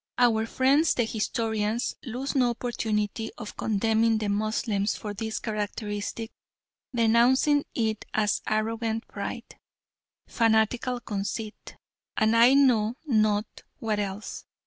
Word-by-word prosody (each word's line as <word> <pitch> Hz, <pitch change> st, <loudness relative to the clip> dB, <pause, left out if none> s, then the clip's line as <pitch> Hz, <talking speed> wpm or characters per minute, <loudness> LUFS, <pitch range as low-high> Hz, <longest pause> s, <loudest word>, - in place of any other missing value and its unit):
Our 225 Hz, -2 st, +3 dB
friends 275 Hz, +7 st, +3 dB
the 240 Hz, -, +2 dB
historians 220 Hz, 0 st, -1 dB
lose 255 Hz, +3 st, -4 dB
no 255 Hz, -4 st, +3 dB
opportunity 225 Hz, -2 st, -2 dB
of 215 Hz, -2 st, -8 dB
condemning 225 Hz, +1 st, +2 dB
the 215 Hz, -1 st, -2 dB
Moslems 210 Hz, 0 st, 0 dB
for 210 Hz, -1 st, -5 dB
this 220 Hz, +2 st, -4 dB
characteristic, 210 Hz, +1 st, -4 dB, 0.6 s
denouncing 245 Hz, +5 st, +3 dB
it 220 Hz, -2 st, -1 dB
as 210 Hz, -2 st, +1 dB
"arrogant 225 Hz, +1 st, -1 dB
pride," 230 Hz, +4 st, -7 dB, 0.7 s
"fanatical 230 Hz, +2 st, +1 dB
conceit," 210 Hz, +1 st, -5 dB, 0.4 s
and 220 Hz, +1 st, +3 dB
I 240 Hz, +4 st, +7 dB
know 240 Hz, -5 st, +4 dB
not 215 Hz, -5 st, +2 dB, 0.3 s
what 215 Hz, -2 st, -1 dB
else. 200 Hz, +1 st, -5 dB
220 Hz, 110 wpm, -27 LUFS, 215-235 Hz, 0.7 s, I